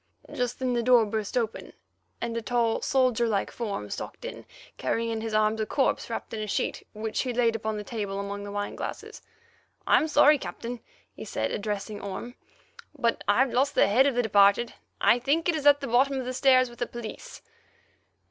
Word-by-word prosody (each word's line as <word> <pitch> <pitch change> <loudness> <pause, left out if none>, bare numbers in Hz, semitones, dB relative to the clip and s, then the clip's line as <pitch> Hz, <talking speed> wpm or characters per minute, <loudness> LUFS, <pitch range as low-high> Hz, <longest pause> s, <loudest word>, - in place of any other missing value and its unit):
Just 245 0 -2
then 255 -1 -1
the 240 - +1
door 240 -1 +5
burst 215 +1 -3
open, 225 -2 -3 0.5
and 235 -1 -3
a 230 - -1
tall, 230 0 0
soldier 255 -3 +2
like 205 -3 -1
form 205 - -4
stalked - - -6
in, - - -8 0.3
carrying 230 0 -1
in 225 -1 -3
his 220 -1 -3
arms 215 +1 +2
a - - 0
corpse 270 - 0
wrapped 230 - -5
in 220 - -3
a 215 - -4
sheet, - - -2
which 220 0 -3
he 255 - -2
laid 235 -1 +2
upon 220 -1 -3
the 210 - -5
table 205 -3 -4
among 200 0 -5
the 205 - -7
wine 205 0 -3
glasses. - - -7 0.6
"I'm 315 - +4
sorry, 295 -1 +5
Captain," 240 -1 -6 0.3
he - - -9
said, - - -2
addressing 205 0 -4
Orme, 200 +5 -6 0.6
"but 235 -4 0
I've 245 +5 +3
lost 270 +3 +1
the - - +5
head 250 +7 +4
of 275 - 0
the 245 - +2
departed. 205 +2 +4 0.3
I 240 - +4
think 290 +7 +1
it 345 - +3
is 300 -2 0
at 285 0 +6
the 275 - -3
bottom 265 +4 +2
of 255 - -4
the 255 - -3
stairs 255 -1 +4
with 240 -1 -14
the 240 - -1
police. 235 -2 -9
235 Hz, 205 wpm, -27 LUFS, 215-255 Hz, 0.6 s, at